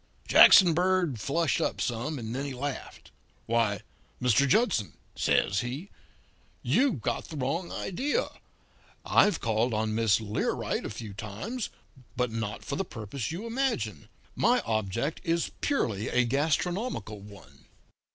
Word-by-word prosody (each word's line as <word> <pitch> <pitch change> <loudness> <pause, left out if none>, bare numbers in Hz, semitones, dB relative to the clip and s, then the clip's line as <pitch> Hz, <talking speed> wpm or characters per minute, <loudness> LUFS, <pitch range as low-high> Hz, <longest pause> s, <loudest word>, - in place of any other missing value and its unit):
"Jackson 180 -4 +8
Bird 175 -6 +1
flushed 145 +5 0
up - - -1
some, 125 +6 -2
and 115 -2 -5
then 135 +2 -2
he 140 -2 -5
laughed. 140 +1 -6 0.3
"'Why, 110 -4 +1 0.4
Mr. 125 +2 +3
Judson,' 130 - +2 0.2
says 100 - +2
he, 130 - -5 0.7
'you've 250 - +2
got - - -1
the 155 - -8
wrong 150 +7 -2
idea. 265 +11 -1 0.8
I've 205 - +4
called 115 +1 0
on 110 0 0
Miss 110 -2 +3
Learight 105 -1 -2
a - - -6
few 110 -1 -7
times; 110 - -5 0.5
but 125 -1 0
not 110 -2 -4
for - - -3
the 195 - 0
purpose 120 - -5
you 180 +7 -5
imagine. 230 - -2 0.3
My 245 +5 +3
object 110 - -2
is 165 0 0
purely 110 - 0
a 125 0 +2
gastronomical 155 - -1
one.' 100 0 -15
125 Hz, 135 wpm, -28 LUFS, 110-175 Hz, 0.8 s, Jackson